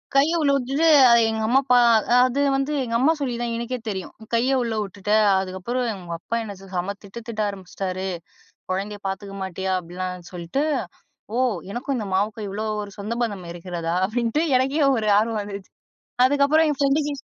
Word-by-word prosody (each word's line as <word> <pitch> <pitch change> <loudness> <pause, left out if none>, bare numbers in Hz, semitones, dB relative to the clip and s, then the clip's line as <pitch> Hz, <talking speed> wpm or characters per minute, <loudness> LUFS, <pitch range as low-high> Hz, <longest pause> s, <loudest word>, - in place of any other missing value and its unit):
கைய 280 +4 +5
உள்ள 285 -2 +3
உட்டுட்டு, 275 +5 +1 0.2
அத 235 - +7
எங்க 220 0 -2
அம்மா 255 +4 +4
பா 250 - +7 0.5
அது 255 +2 -1 0.2
வந்து 270 +2 -1
எங்க 230 -2 -3
அம்மா 280 +6 +4
சொல்லி 255 -4 -2
தான் 235 -1 -2
எனக்கே 235 +2 -3
தெரியும். 190 -3 -5
"உன் 220 0 -14
கைய 260 +3 +2
உள்ள 230 -2 -2
உட்டுட்ட. 200 +1 -5 0.3
அதுக்கப்புறம் 190 +7 -3
உங்க 175 -2 -7
அப்பா 230 - -4
என்ன 205 -2 -7
செம 190 +1 -4
திட்டு 200 +3 -9
திட்ட 220 -2 -3
ஆரம்பிச்சிட்டாரு 190 -1 -5 0.6
குழந்தைய 200 +2 -3
பாத்துக்க 195 +1 -5
மாட்டியா?" 190 0 -3
அப்படிலாம் 180 +1 -6
சொல்ட்டு. 175 +10 -2 0.7
"ஓ! - - +1 0.3
எனக்கும் 260 +4 -2
இந்த 215 - -4
மாவுக்கும் 210 +2 -1
இவ்ளோ 210 +3 -4 0.2
ஒரு 200 -1 -9
சொந்த 215 +3 -3
பந்தம் 200 -6 -3
இருக்கிறதா" 170 -1 -4
அப்படின்ட்டு 235 +7 0 0.2
எனக்கே 270 +4 +1
ஒரு 215 -2 -1
ஆர்வம் 220 0 0
வந்துச்சு. 200 -1 -8 0.6
அதுக்கப்புறம் 285 +3 +3
என் 290 - -3
ஃப்ரெண்டுக்கு 285 +1 +2
215 Hz, 170 wpm, -23 LUFS, 190-255 Hz, 0.7 s, அத